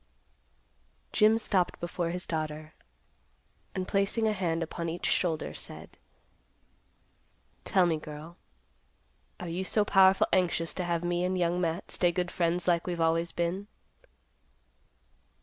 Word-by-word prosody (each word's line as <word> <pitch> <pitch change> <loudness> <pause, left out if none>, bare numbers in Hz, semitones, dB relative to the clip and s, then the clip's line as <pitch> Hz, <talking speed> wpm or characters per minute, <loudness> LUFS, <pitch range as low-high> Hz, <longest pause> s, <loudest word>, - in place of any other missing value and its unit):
Jim 215 +1 +5
stopped 190 -5 +1
before 175 0 -2
his 180 +1 -3
daughter, 155 -1 -4 1.0
and, 185 -1 -2
placing 200 +3 +1
a 215 - +2
hand 170 -4 -1
upon 170 +1 -4
each 170 +2 -4
shoulder, 165 -4 0
said, - - -8 1.7
"Tell 185 -2 +3
me, 165 -2 +1
girl; 155 +2 -9 1.0
are 180 - -6
you 175 +3 -2
so 210 +2 +2
powerful 190 -1 +5
anxious 170 -3 +1
to 180 - -3
have 170 -1 -1
me 175 0 0
and 185 +1 0
Young 175 0 +1
Matt 170 +1 -2
stay 175 -1 +4
good 175 0 -2
friends 175 0 0
like 170 -1 +2
we've 175 -1 -2
always 165 +1 +1
been?" 175 +4 -2
175 Hz, 130 wpm, -29 LUFS, 165-185 Hz, 1.7 s, Jim